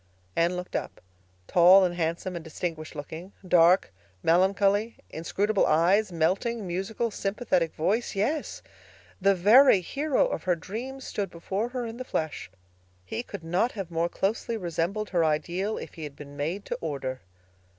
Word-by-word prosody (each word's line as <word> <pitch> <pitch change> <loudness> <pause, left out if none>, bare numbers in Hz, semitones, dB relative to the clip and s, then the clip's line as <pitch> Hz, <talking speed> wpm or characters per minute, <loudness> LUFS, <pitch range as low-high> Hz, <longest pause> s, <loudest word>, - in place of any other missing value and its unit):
Anne 170 +2 +2
looked 180 0 -6
up. - - -4 0.5
Tall 180 - +7
and 175 - -1
handsome 170 +2 -2
and 170 - -5
distinguished 160 -1 -5
looking—dark, 175 - +2 0.3
melancholy, 200 +5 +3 0.2
inscrutable 200 +6 0
eyes—melting, 190 +5 +2
musical, 195 +6 -2
sympathetic 195 -5 -1
voice—yes, 220 - -1 0.6
the 195 +1 +4
very 210 +3 +6
hero 280 - +1
of - - -3
her 180 -1 +3
dreams 245 +10 -6
stood 200 -3 -3
before 190 +7 -3
her 250 -1 -3
in 225 0 -6
the 255 - -5
flesh. 160 - -3 0.6
He 160 - -3
could 200 -7 -9
not 180 +9 0
have 195 -5 -6
more 170 +1 0
closely 220 +5 -1
resembled 180 +3 -2
her 175 -3 +2
ideal 170 +7 0
if - - -8
he 160 - -8
had 145 -2 -7
been 145 -1 -11
made 165 +8 -3
to - - -4
order. 135 -5 -4
185 Hz, 145 wpm, -27 LUFS, 165-215 Hz, 0.6 s, Tall